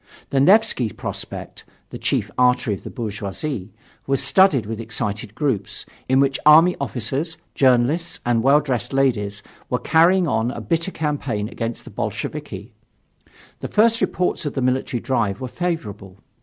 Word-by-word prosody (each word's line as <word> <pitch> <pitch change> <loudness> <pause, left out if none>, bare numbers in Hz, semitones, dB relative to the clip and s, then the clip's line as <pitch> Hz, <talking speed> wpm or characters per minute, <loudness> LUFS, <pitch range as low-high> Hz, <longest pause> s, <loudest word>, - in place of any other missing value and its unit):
The 135 - +2
Nevsky 185 - +4
Prospect, - - -7 0.3
the - - -7
chief - - -1
artery 125 -3 +2
of 100 - -7
the - - -7
bourgeoisie, 110 0 -5 0.4
was 135 0 +1
studded 140 - +4
with 110 +1 -5
excited 110 -1 -4
groups, 130 -10 -2 0.2
in 130 +1 +4
which 135 0 +2
army 160 +4 +7
officers, 140 +5 -2 0.2
journalists 135 +6 +2
and 120 -1 +2
well 140 +4 +5
dressed 125 -3 -3
ladies 105 -7 0 0.3
were 125 - +1
carrying 170 +7 +4
on 115 -4 +1
a - - -5
bitter 165 +1 -1
campaign 140 - -2
against 115 -1 -4
the - - -10
Bolsheviki. - - -5 0.9
The - - -4
first 230 +2 +3
reports 180 - 0
of 145 - -4
the 135 - -1
military 130 -1 0
drive 110 -7 0
were 130 - -4
favorable. 105 - -4
130 Hz, 150 wpm, -21 LUFS, 115-155 Hz, 0.9 s, army